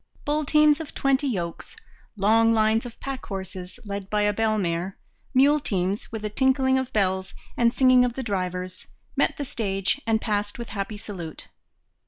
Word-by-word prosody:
Bull 300 +1 0
teams 300 +1 +5
of 320 - -8
twenty 275 +1 +2
yokes, 175 -9 -4 0.4
long 225 +3 +4
lines 220 +2 +2
of 235 - -13
pack 270 -1 -5
horses 190 -1 -6
led 200 -1 -5
by 210 -1 +1
a 205 0 +2
bell 220 0 +1
mare, 175 0 -2 0.3
mule 285 +3 +5
teams 195 -5 -2
with 220 -1 -5
a - - +1
tinkling 265 +2 +3
of 260 -1 -4
bells 190 -2 0 0.2
and 235 -1 +3
singing 255 0 +5
of 245 -1 0
the 265 - -4
drivers, 185 -3 -3 0.3
met - - +1
the 285 - -3
stage 205 -1 -1
and 220 -1 +3
passed 205 -2 -2
with 235 -1 -6
happy 205 +1 -4
salute. 185 -7 -8
220 Hz, 175 wpm, -25 LUFS, 195-260 Hz, 0.4 s, teams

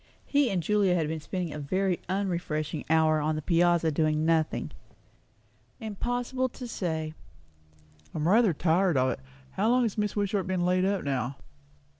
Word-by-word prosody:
He 285 -3 +2
and 185 -4 -1
Julia 200 0 +2
had 160 -3 0
been 160 +1 -3
spending 175 0 -4
a 150 - -5
very 185 +5 0
unrefreshing 170 -6 -2
hour 160 -1 +4
on 155 +1 0
the 155 - -3
piazza 170 -1 +3
doing 155 0 +1
nothing. 160 -1 +1 1.1
"Impossible 245 +4 -2
to 250 +1 -8
say." 160 -7 -3 1.0
"I'm 155 +1 0
rather 215 +2 +5
tired 170 +1 +2
of 130 0 +3
it. - - -5 0.3
How 210 +4 +1
long 250 +1 +4
has 225 -2 -1
Mrs. 210 -1 -1
Wishart 200 -2 0
been 185 -2 0
laid 185 +1 +2
up 195 -1 0
now?" 135 -2 -2
175 Hz, 160 wpm, -28 LUFS, 155-200 Hz, 1.1 s, rather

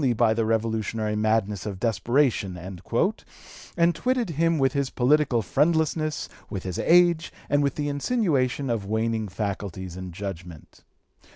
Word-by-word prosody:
274) 120 -3 +3
by - - +3
the 115 0 0
revolutionary 110 -1 -1
madness 105 -2 0
of 100 -3 -5
desperation," 115 -4 +1
and 120 - -2
twitted 250 0 0
him 165 +2 +1
with 135 -2 +2
his 140 -2 0
political 130 -2 +2
friendlessness, 155 - +1 0.2
with 95 -5 -5
his 95 -2 -4
age, 170 -1 +4 0.2
and 145 0 +2
with 140 -2 0
the 145 -1 -2
insinuation 145 - 0
of 105 -4 -2
waning 110 0 -1
faculties 95 -2 -4
and 95 -1 -7
judgment. 90 -3 -8
115 Hz, 135 wpm, -25 LUFS, 100-150 Hz, 0.2 s, age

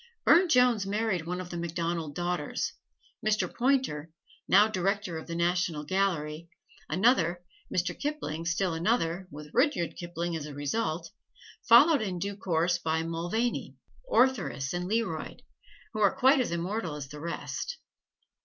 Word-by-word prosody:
Burne 350 +2 +6
Jones 250 -7 +4
married 200 -5 -1
one 180 +1 -2
of 180 -1 -7
the 175 - -4
MacDonald 170 -2 -3
daughters; 175 0 -2 0.5
Mr. 215 0 +2
Poynter, 250 - +1 0.4
now 205 +3 +6
Director 195 -4 -1
of - - -11
the 170 - -4
National 170 -2 0
Gallery, 170 -3 -1 0.4
another; 180 -1 +2 0.3
Mr. 175 0 0
Kipling 270 - -4
still 175 +1 0
another 175 0 0
with 150 -1 -10
Rudyard 255 - +1
Kipling 170 0 -4
as 155 -2 -4
a 145 - -8
result, 160 +2 -2 0.6
followed 280 +5 +7
in 190 -4 -2
due 200 +3 -3
course 175 -2 0
by 160 0 0
Mulvaney, 175 +9 -2 0.3
Ortheris 235 - +2
and 180 +1 -3
Learoyd, 205 -8 -2 0.5
who 215 - -4
are 200 - +4
quite 265 +3 +5
as 250 - 0
immortal 170 0 -2
as 145 -2 -6
the 150 +1 -9
rest. 170 - -4
175 Hz, 145 wpm, -29 LUFS, 165-215 Hz, 0.6 s, followed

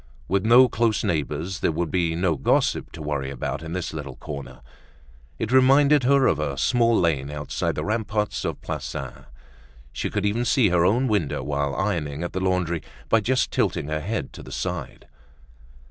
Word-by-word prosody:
With 95 0 +1
no 120 +3 +7
close 115 -3 0
neighbors 80 +3 -2
there - - +1
would 85 +1 -2
be 85 -3 +1
no 85 -1 +1
gossip - - +1
to - - -7
worry 70 -3 -2
about 70 +2 -4
in 80 0 -6
this 90 -3 -3
little 70 -4 -6
corner. 70 -5 -8 0.8
It 110 - -3
reminded 135 +2 +5
her 140 0 +4
of 80 - +2
a 70 -3 -2
small 115 - +3
lane 75 -5 +1
outside 75 -1 -3
the - - -3
ramparts 105 -1 -1
of - - -3
Plassans. 70 -2 -6 0.7
She - - -2
could 105 -1 -2
even 110 +4 +1
see 120 -4 +3
her 90 -1 +3
own 120 +8 +3
window 105 - 0
while 70 -1 -1
ironing 85 -7 -2
at 85 - -4
the 95 - -1
laundry 90 -3 0 0.3
by 115 - +5
just 130 +5 0
tilting 75 - 0
her 75 0 -2
head 110 +8 -3
to - - -10
the - - -11
side. - - -5
90 Hz, 180 wpm, -24 LUFS, 75-115 Hz, 0.8 s, no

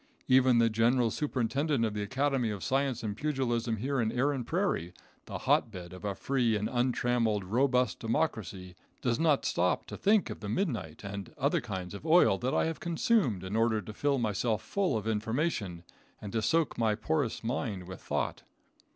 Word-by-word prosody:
Even 130 -1 +5
the 115 0 +5
general 115 +1 +2
superintendent 140 0 0
of 110 - -2
the 105 - -3
Academy 130 +2 0
of 100 -3 -4
Science 135 -3 0
and 105 -2 -2
Pugilism 120 -4 -1
here 135 +4 -1
in 110 -1 0
Erin 135 +1 0
Prairie, 160 - -1 0.3
the - - -4
hotbed 90 -5 0
of 90 - -11
a 100 -2 -2
free 125 -3 +1
and 105 +1 -1
untrammeled, 120 -4 +1
robust 125 +3 +1
democracy, 105 - -2 0.3
does 120 +1 +1
not 155 -4 +3
stop 90 +1 +1
to - - -8
think 210 0 +2
of - - -7
the 105 - -6
midnight 110 - -2
and 100 -1 -6
other - - +1
kinds 90 -1 -5
of 100 - -8
oil 160 - +5
that 130 +2 -1
I - - +3
have 165 0 -3
consumed 170 - +1
in 95 +3 -4
order 115 -1 +2
to 105 +1 -8
fill 140 +5 +1
myself 110 -1 0
full 190 - 0
of 105 - -5
information 110 - -1 0.4
and 105 -2 -8
to 110 - +1
soak 160 +2 +1
my 110 -2 +2
porous 135 +2 -1
mind 110 -6 -3
with 95 -1 -9
thought. - - -2
115 Hz, 180 wpm, -30 LUFS, 105-135 Hz, 0.4 s, Even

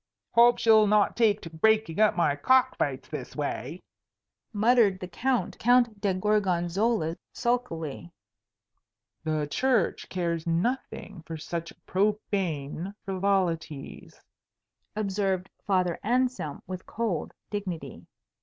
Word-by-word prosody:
"Hope 240 +1 +6
she'll 220 -2 +5
not 210 0 +3
take 215 -3 +3
to 165 - -8
breaking 215 +1 +2
up 215 -1 +4
my 160 -5 +2
cock 255 - +3
fights - - -2
this - - -7
way," - - -4 0.7
muttered 215 -3 +3
the 180 - -6
Count 250 +7 -1 0.4
de 200 -3 +1
Gorgonzola, 185 -2 +1 0.2
sulkily. 175 - -2 1.1
"The 155 -2 0
Church 240 - 0
cares 170 -2 -2
nothing 195 +1 -2
for 165 - -5
such 165 +1 -5
profane 190 -4 -1
frivolities," 180 -6 -2 0.8
observed 195 -3 -1 0.2
Father 185 -3 +1
Anselm 245 - -1
with 185 0 -7
cold 210 -9 -2 0.2
dignity. 195 -5 -5
195 Hz, 105 wpm, -27 LUFS, 170-220 Hz, 1.1 s, Hope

